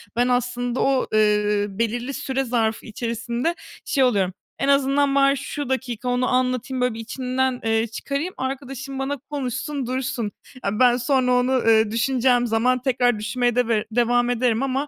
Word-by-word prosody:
Ben 245 +1 +2
aslında 245 0 -1
o, 270 -1 +2
ııı, 210 -1 +2
belirli 240 +4 -1
süre 270 0 -2
zarfı 230 -3 -1
içerisinde 235 +7 -2 0.3
şey 275 - +2
oluyorum: 200 -7 +2 0.3
"En 275 - 0
azından 275 0 +3
bari 275 0 +4
şu 285 +1 -5
dakika 250 -2 -2
onu 245 +1 +1
anlatayım, 255 0 0
böyle, 250 -1 +1
bir 225 - -8
içimden, 255 +2 -2
eee, 225 0 +1
çıkarayım. 280 - -4
Arkadaşım 270 0 -5
bana 275 +1 -2
konuşsun 280 0 -3
dursun. 250 -4 -2 0.3
E, 200 +1 -1
ben 245 -1 +5
sonra 255 0 +1
onu, 250 +1 +2
ııı, 225 -4 +3
düşüneceğim 245 +1 +2
zaman 240 +3 +1
tekrar 245 -3 +1
düşünmeye 240 +2 0
deve 230 -3 +1
devam 240 +1 +2
ederim 245 0 +1
ama 270 +2 -1
250 Hz, 155 wpm, -23 LUFS, 230-265 Hz, 0.3 s, ben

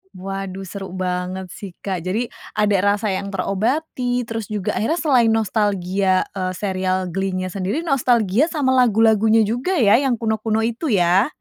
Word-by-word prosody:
Waduh 195 0 -5
seru 190 0 -7
banget 185 0 -3
sih 200 -3 -8
Kak, 190 -3 -2
jadi 220 +6 -2 0.2
ada 210 -2 +2 0.2
rasa 210 -1 -2
yang 195 +1 -3
terobati, 245 +6 -1
terus 225 -3 -5
juga 210 -3 -2
akhirnya 310 - 0
selain 250 -7 +3
nostalgia, 195 -3 +1
eee, 185 -1 -3
serial 185 -2 -1
Glee-nya 185 0 -2
sendiri 200 - -2
nostalgia 250 - +2
sama 290 -6 0
lagu-lagunya 225 -2 +4
juga 245 - -1
ya 225 - +5
yang 265 -4 +1
kuno-kuno 220 0 -1
itu 235 +7 -2
ya? 180 +4 +4
210 Hz, 145 wpm, -21 LUFS, 190-235 Hz, 0.2 s, ya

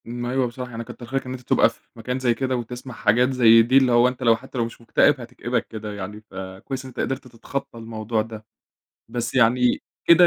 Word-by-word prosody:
ما 120 +1 -4
أيوه 130 -1 +1
بصراحة، 125 +1 -7
يعني 115 0 -5
كتّر 120 - -10
خيرك 135 +2 -2
إن 125 - -6
أنت 130 -1 -6
تبقى - - +4
في - - -18 0.2
مكان 125 +3 -3
زي 125 -2 +2
كده، 130 +1 -1
وتسمع 125 +2 -6
حاجات 120 +2 +3
زي 115 -3 +7
دي، 125 +4 +4
اللي 130 -2 +5
هو 120 +1 +6
أنت، 125 0 -4
لو 115 -2 +6
حتى 130 +3 -10
لو 115 - +2
مش 115 - -10
مكتئب، 130 +4 +3
هتكئبك 120 +1 -3
كده 110 -2 -6
يعني، 105 +1 -7
فكويس 110 +6 -7
إن - - -7
أنت 125 - -10
قدرت 135 0 -2
تتخطى 125 +2 -6
الموضوع 110 -1 -2
ده، 110 -1 -8 0.6
بس 120 -1 -3
يعني 125 0 +3 0.2
كده 175 +1 +8
120 Hz, 220 wpm, -23 LUFS, 115-130 Hz, 0.6 s, كده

